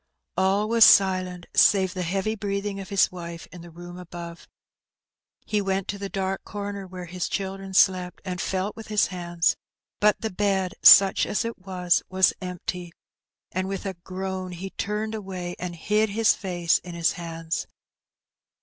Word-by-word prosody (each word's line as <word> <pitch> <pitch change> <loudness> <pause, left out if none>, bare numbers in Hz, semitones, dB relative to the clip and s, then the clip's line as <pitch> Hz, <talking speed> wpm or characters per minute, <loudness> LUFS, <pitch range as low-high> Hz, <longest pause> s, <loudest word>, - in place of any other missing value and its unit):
All 195 +3 +2
was 230 0 +5
silent, 185 -3 +4
save 190 -2 +4
the 185 - -4
heavy 195 +5 -1
breathing 200 -1 -3
of 195 - -8
his 200 -2 +3
wife 170 -2 -8
in 180 - -10
the 175 - -11
room 175 +2 -10
above. 170 -1 -9 1.0
He 210 -1 0
went 195 -1 -1
to 200 - -3
the 200 0 -5
dark 195 0 -3
comer 200 -1 -6
where 180 -1 -8
his 180 +1 -4
children 195 -1 -4
slept, 185 -2 +3
and 180 -1 -3
felt 190 +2 -2
with 225 - -10
his 210 -1 +2
hands; 175 -1 0 0.4
but 210 0 +3
the 220 - -3
bed, 190 -1 0
such 195 -1 +8
as 210 - -1
it 230 -2 -5
was, 180 -2 0
was 185 0 +3
empty, 180 -1 -5 0.6
and 185 +1 -2
with 195 +1 -4
a 195 - -2
groan 185 +1 -5
he 190 +2 -7
turned 210 +2 -3
away 185 -4 -5
and 180 -1 -5
hid 210 +6 +1
his 220 +2 +3
face 175 -4 0
in 175 -1 -9
his 170 -1 +2
hands. 165 -1 -4
190 Hz, 170 wpm, -25 LUFS, 180-200 Hz, 1.0 s, such